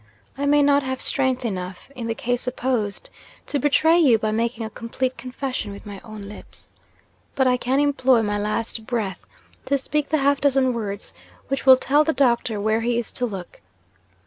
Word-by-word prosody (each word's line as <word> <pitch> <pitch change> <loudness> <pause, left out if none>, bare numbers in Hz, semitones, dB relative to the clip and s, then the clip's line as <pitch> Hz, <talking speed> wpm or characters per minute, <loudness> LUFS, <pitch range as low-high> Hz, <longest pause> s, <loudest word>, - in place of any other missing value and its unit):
I 285 +1 -2
may 290 0 +5
not 285 0 +4
have 260 -1 -3
strength 260 -2 0
enough, 185 +1 -5
in 235 -2 -5
the 225 - -2
case 245 +1 -1
supposed, 245 -5 -2 0.3
to 285 - -1
betray 320 +5 +4
you 265 -9 +5
by 215 0 -1
making 230 +1 -1
a - - -5
complete 250 +3 -3
confession 255 -4 -4
with 200 - -10
my 200 -2 -8
own 215 -2 -9
lips; 200 +1 -11 0.6
but 265 - +2
I 250 -1 +4
can 255 +2 0
employ 265 -5 +3
my 205 -1 -1
last 220 +1 -3
breath 220 -7 -2 0.4
to 280 - +2
speak 295 +2 -2
the 310 - +2
half 280 0 +2
dozen 270 -2 +3
words 205 -3 -5 0.4
which 275 0 -2
will 260 -1 +10
tell 290 +3 +3
the 320 +1 0
doctor 235 -5 +1
where 220 +2 +1
he 235 +1 0
is 235 - -3
to 245 - -2
look. 190 -5 -8
245 Hz, 190 wpm, -23 LUFS, 220-275 Hz, 0.6 s, will